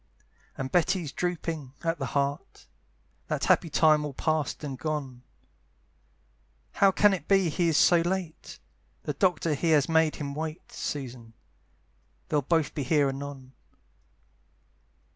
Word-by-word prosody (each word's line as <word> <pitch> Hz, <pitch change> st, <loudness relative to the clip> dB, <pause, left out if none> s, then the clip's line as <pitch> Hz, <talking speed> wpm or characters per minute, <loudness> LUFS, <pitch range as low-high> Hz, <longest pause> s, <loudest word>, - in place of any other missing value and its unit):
And 130 Hz, 0 st, -4 dB
Betty's 175 Hz, -3 st, +1 dB
drooping 165 Hz, -6 st, -3 dB
at 165 Hz, -1 st, -1 dB
the 135 Hz, -, -2 dB
heart, 140 Hz, +1 st, -3 dB, 0.6 s
That -, -, -2 dB
happy 165 Hz, -, +3 dB
time 155 Hz, 0 st, +4 dB
all 145 Hz, -3 st, -5 dB
past 155 Hz, -1 st, -1 dB
and 140 Hz, -3 st, -4 dB
gone, 135 Hz, -3 st, -4 dB, 1.5 s
"How 200 Hz, -, +4 dB
can 205 Hz, +1 st, +4 dB
it 165 Hz, -6 st, -4 dB
be 195 Hz, -3 st, +3 dB
he 170 Hz, +2 st, 0 dB
is 160 Hz, -2 st, +2 dB
so 175 Hz, -1 st, +5 dB
late? 175 Hz, -2 st, -4 dB, 0.5 s
"The -, -, -3 dB
doctor 170 Hz, -5 st, +1 dB
he 165 Hz, +3 st, -1 dB
has 145 Hz, -2 st, +3 dB
made 160 Hz, -1 st, +3 dB
him 140 Hz, -2 st, -5 dB
wait, 155 Hz, +3 st, -6 dB
"Susan! 125 Hz, -5 st, -6 dB, 1.0 s
they'll 150 Hz, -, +2 dB
both 155 Hz, +1 st, 0 dB
be 145 Hz, -, -3 dB
here 140 Hz, +1 st, +2 dB
anon." 135 Hz, -1 st, -7 dB
155 Hz, 135 wpm, -27 LUFS, 140-170 Hz, 1.5 s, so